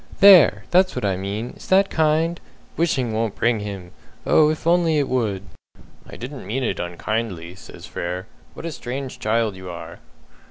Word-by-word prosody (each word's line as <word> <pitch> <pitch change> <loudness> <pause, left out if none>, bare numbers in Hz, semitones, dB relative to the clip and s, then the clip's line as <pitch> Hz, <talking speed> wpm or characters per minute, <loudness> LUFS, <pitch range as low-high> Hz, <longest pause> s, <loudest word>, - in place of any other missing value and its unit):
"There! 175 - +7
That's 185 +1 +4
what - - -2
I 95 -2 +1
mean! 100 +5 -4
Is - - -13
that 195 +1 +4
kind? 160 +2 +1 0.4
'Wishing 135 -9 0
won't 110 -1 -1
bring 115 -2 +1
him!' 100 -4 -7 0.3
Oh, 150 -1 +5
if 155 0 -3
it - - -1
only 165 -3 +3
would!" 115 -8 -1 0.7
"I - - -10
didn't 130 -3 -8
mean 130 +6 -2
it - - -2
unkindly," 90 0 -3
says 95 - -12
Frere. 90 +2 -5 0.3
"What - - -8
a 165 - -3
strange 130 -1 -6
child 110 -1 0
you 95 -1 -9
are." 85 -1 -9
115 Hz, 170 wpm, -22 LUFS, 95-155 Hz, 0.7 s, There